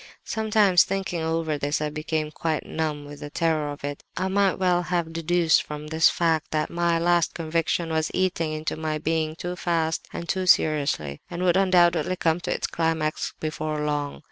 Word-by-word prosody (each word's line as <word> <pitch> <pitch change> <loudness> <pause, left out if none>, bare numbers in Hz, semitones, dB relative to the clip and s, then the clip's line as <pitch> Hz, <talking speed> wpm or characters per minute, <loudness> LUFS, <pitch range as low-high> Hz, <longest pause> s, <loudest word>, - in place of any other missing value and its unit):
"Sometimes, 215 -5 +4
thinking 190 -3 -3
over 160 -2 -1
this, 145 +1 0
I 150 0 -2
became 155 0 -2
quite 155 0 -2
numb 150 -2 -3
with 145 0 -10
the 145 - -7
terror 155 -2 0
of 145 - -9
it; 145 0 -5
and 185 - 0
I - - +1
might 195 0 +2
well 180 -2 +2
have 175 -2 -2
deduced 165 0 +3
from 150 0 -7
this 160 +1 +4
fact, 165 -2 0
that 155 -1 -1
my 170 -1 +1
'last 175 0 +2
conviction' 165 0 -1
was 160 0 0
eating 180 -4 0
into 155 0 -3
my 155 -1 -2
being 155 0 -1
too 175 +2 -5
fast 165 -3 -1
and 170 - -6
too 185 0 -1
seriously, 140 - +2
and 175 +1 -4
would 175 -2 +3
undoubtedly 185 -2 +3
come 165 -1 +1
to - - -4
its - - -1
climax 160 -2 -1
before 155 -1 -3
long. 145 -1 -2
160 Hz, 190 wpm, -25 LUFS, 155-175 Hz, -, Sometimes